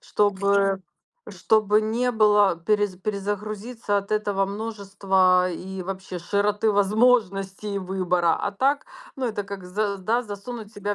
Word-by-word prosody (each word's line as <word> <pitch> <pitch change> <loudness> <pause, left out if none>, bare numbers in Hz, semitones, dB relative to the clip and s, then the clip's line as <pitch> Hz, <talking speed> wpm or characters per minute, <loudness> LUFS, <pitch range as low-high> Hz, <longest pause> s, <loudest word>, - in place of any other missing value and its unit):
чтобы 200 -1 +1 0.5
чтобы 215 -1 +2
не 235 +3 0
было 210 -5 +4
перез 205 +2 0
перезагрузиться 205 +2 -3
от 200 +1 -3
этого 205 -2 +1
множества 195 -3 +1
и 190 +2 -6
вообще 190 -1 -6
широты 205 +4 +1
возможностей 205 -2 +1
выбора. 180 -3 +1
А - - -2
так, 275 - 0 0.3
ну, 260 -2 -2
это 210 -3 -3
как, 200 -1 -7
за 200 +2 -2
да, 225 +6 0
засунуть 215 0 -8
себя 205 0 -3
205 Hz, 125 wpm, -24 LUFS, 195-215 Hz, 0.5 s, было